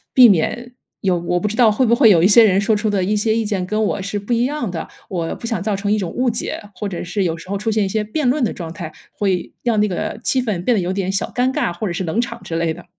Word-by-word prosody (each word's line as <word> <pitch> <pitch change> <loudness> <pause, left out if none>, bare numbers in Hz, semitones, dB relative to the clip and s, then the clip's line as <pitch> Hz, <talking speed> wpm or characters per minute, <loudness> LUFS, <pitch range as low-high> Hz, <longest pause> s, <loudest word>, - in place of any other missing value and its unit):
避 250 -3 +9
免 240 +7 0 0.3
有 185 -3 +1
我 175 +1 -1
不 210 - 0
知 215 - -5
道 225 -4 +5
会 255 +5 +2
不 235 - +4
会 230 -5 +6
有 170 -4 +5
一 185 - +6
些 225 +2 +7
人 195 -1 +4
说 215 +1 +2
出 210 +1 -1
的 200 -2 0
一 210 +3 0
些 220 +1 +1
意 225 - 0
见 200 -4 -1
跟 215 +2 -1
我 200 -2 -1
是 200 +2 -3
不 205 +4 -11
一 235 +1 +2
样 275 -7 -2
的， 165 - -5 0.2
我 170 -4 -3
不 230 - -7
想 225 -6 -2
造 210 -1 -1
成 200 +1 -2
一 215 - +2
种 180 -4 -3
误 250 0 0
解， 230 - -3
或 210 - -5
者 180 - -5
是 180 +2 -2
有 165 -1 -1
时 165 - -13
候 200 - -2
出 210 +3 -2
现 215 -1 +1
一 - - -1
些 210 +2 -1
辩 255 +5 -1
论 265 0 +2
的 - - 0
状 165 -3 -7
态， 165 -2 -7 0.2
会 190 -4 -1
让 230 -3 +1
那 210 - +2
个 185 +3 -3
气 255 0 +1
氛 200 -7 -2
变 245 - +3
得 - - +1
有 180 +1 -2
点 190 -1 -2
小 195 - -2
尴 250 +1 +2
尬， 175 - -1
或 190 +5 -4
者 175 - -2
是 185 - -3
冷 190 +8 0
场 245 - -5
之 165 - -4
类 165 -1 0
的。 175 - -12
205 Hz, 335 characters per minute, -19 LUFS, 180-225 Hz, 0.3 s, 避